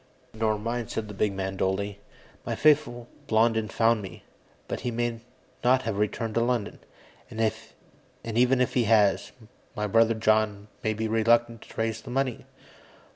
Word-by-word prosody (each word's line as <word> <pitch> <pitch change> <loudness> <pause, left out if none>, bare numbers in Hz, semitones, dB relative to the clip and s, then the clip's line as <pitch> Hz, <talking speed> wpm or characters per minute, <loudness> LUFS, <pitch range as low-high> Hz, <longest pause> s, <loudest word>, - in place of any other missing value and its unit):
"Nor 110 -1 0
mine," 115 +2 -3
said 110 -1 -4
the 105 - -8
big 105 +1 0
man 95 0 -4
dully. 100 +2 -1 0.4
"My - - -3
faithful 140 -6 +2 0.2
Blondin 110 0 +2
found 115 +1 +2
me, 95 -3 -10 0.4
but - - -4
he 125 - -3
may 120 0 -2 0.4
not 130 +1 +4
have 110 -4 -2
returned 110 +1 -1
to 115 - +1
London. 120 -3 -1 0.5
And 110 - -8 0.9
even 125 +3 +2
if 125 - +1
he 120 -2 +2
has, 105 -3 +3 0.4
my 105 - -2
brother 115 +2 +3
John 110 -2 +1
may 110 -1 0
be 110 +1 -2
reluctant 115 +1 +2
to - - -15
raise 110 0 -1
the 130 - -11
money." 130 -1 -2
115 Hz, 160 wpm, -27 LUFS, 105-120 Hz, 0.9 s, not